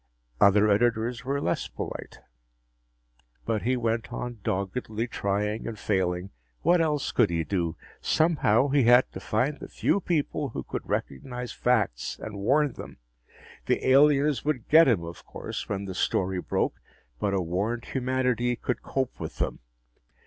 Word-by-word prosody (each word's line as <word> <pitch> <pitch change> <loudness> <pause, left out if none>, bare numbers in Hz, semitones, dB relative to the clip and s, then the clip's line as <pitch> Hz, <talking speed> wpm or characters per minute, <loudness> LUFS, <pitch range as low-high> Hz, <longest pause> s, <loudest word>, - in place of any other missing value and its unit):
Other 100 +1 +6
editors 120 +3 +1
were 140 +2 -1
less 85 - -1
polite. - - -7 1.2
But 110 -2 0
he 125 +3 +1
went 115 -1 -1
on 120 -2 -5
doggedly 110 +4 -2
trying 105 -1 -2
and 115 - -5
failing. 95 -2 -1 0.3
What 175 0 +4
else 150 -3 0
could 120 -4 +3
he 85 -1 0
do? 85 -3 -1 0.3
Somehow, 145 -6 +3
he 135 -2 +3
had 125 +2 +6
to - - -7
find 130 +9 -1
the - - -8
few - - +1
people 150 -4 -1
who - - -5
could - - -6
recognize 125 - -3
facts 110 - 0
and 105 -2 -7
warn 140 +6 +2
them. - - -10 0.7
The - - +1
aliens 145 +1 +4
would 145 -6 -1
get 160 +1 +8
him, 110 -9 +2
of 85 +1 -8
course, - - -6
when 100 -1 -2
the 95 - -5
story 95 0 0
broke, - - -1 0.4
but 100 -1 0
a - - +2
warned 100 +7 -2
humanity 125 -2 0
could 125 +1 -3
cope 130 -2 -3
with - - -6
them. - - -2
115 Hz, 155 wpm, -27 LUFS, 100-130 Hz, 1.2 s, get